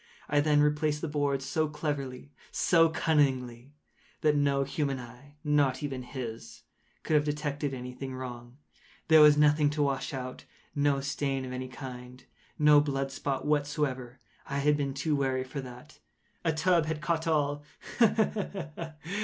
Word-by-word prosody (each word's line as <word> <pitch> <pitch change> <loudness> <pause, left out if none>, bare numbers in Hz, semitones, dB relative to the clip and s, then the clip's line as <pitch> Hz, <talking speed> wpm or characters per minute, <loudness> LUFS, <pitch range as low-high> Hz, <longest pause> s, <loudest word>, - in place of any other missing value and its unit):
I 145 - +2
then 145 0 +4
replaced 150 0 +1
the 165 - -2
boards 145 -2 -1
so 155 +4 0
cleverly, 145 -3 -4 0.2
so 165 -2 +4
cunningly, 135 -6 0 0.5
that 150 -1 +3
no 140 -1 +2
human 140 0 -2
eye—not 140 +2 -1
even 135 -3 -3
his—could 110 - -8
have 150 -1 +5
detected 145 -1 -2
any 125 -1 -6
thing 130 0 -6
wrong. 120 -1 -8 0.5
There 160 -1 +8
was 150 -1 +8
nothing 150 0 +4
to 145 0 0
wash 140 -1 -1
out—no 140 +2 -3
stain 135 -1 -2
of 130 - -7
any 130 0 -4
kind—no 130 +3 0
blood 135 -2 -2
spot 135 0 -3
whatever. 145 -4 -1 0.3
I 140 - -3
had 145 +1 +3
been 140 -2 -2
too 145 +2 0
wary 130 -2 0
for 135 +2 -6
that. 125 +3 -12 0.4
A 165 - +2
tub 165 0 +2
had 160 -1 -2
caught 165 +1 -1
all—ha! 145 +9 +1
ha! 190 -7 -3
145 Hz, 145 wpm, -29 LUFS, 130-150 Hz, 0.5 s, There